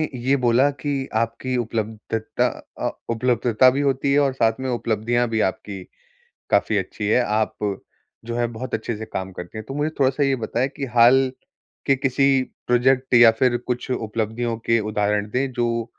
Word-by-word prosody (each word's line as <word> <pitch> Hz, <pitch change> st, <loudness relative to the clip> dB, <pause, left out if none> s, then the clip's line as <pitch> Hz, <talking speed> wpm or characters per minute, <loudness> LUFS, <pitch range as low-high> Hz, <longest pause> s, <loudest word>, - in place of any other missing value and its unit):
ये 130 Hz, +3 st, +1 dB
बोला 125 Hz, +3 st, +3 dB
कि 140 Hz, -1 st, -3 dB
आपकी 115 Hz, +3 st, -2 dB
उपलब्धता 110 Hz, -1 st, -2 dB, 0.3 s
अ, -, -, 0 dB, 0.2 s
उपलब्धता 120 Hz, +1 st, +3 dB
भी 135 Hz, +3 st, -1 dB
होती 140 Hz, 0 st, +1 dB
है 145 Hz, -, +4 dB
और 140 Hz, -2 st, +2 dB
साथ 115 Hz, -1 st, +1 dB
में 130 Hz, -, -3 dB
उपलब्धियाँ 120 Hz, 0 st, 0 dB
भी 110 Hz, -1 st, -1 dB
आपकी 95 Hz, 0 st, -3 dB, 0.7 s
काफ़ी 110 Hz, -, +2 dB
अच्छी 100 Hz, +2 st, -4 dB
हैं, 125 Hz, +3 st, +3 dB
आप 110 Hz, +1 st, 0 dB, 0.7 s
जो 115 Hz, 0 st, -4 dB
है 120 Hz, 0 st, +1 dB
बहुत 130 Hz, +2 st, -5 dB
अच्छे 110 Hz, 0 st, -3 dB
से 110 Hz, -, -6 dB
काम 95 Hz, 0 st, -5 dB
करती 90 Hz, +4 st, -8 dB
हैं। 110 Hz, -, -7 dB
तो 135 Hz, -, -5 dB
मुझे 150 Hz, +2 st, -1 dB
थोड़ा-सा 135 Hz, +1 st, +2 dB
ये 135 Hz, -1 st, +2 dB
बताएँ 130 Hz, +3 st, 0 dB
कि 140 Hz, -, -3 dB
हाल 130 Hz, +3 st, +5 dB, 0.6 s
के 135 Hz, -, +4 dB
किसी 135 Hz, 0 st, +2 dB, 0.2 s
प्रोजेक्ट 130 Hz, +1 st, +2 dB
या 120 Hz, -1 st, +8 dB
फिर 125 Hz, -1 st, +4 dB
कुछ 125 Hz, +1 st, -3 dB
उपलब्धियों 115 Hz, 0 st, -2 dB
के 115 Hz, -1 st, +3 dB
उदाहरण 105 Hz, 0 st, -1 dB
दें, 130 Hz, +3 st, -1 dB
जो 115 Hz, -1 st, -1 dB
120 Hz, 175 wpm, -22 LUFS, 110-130 Hz, 0.7 s, या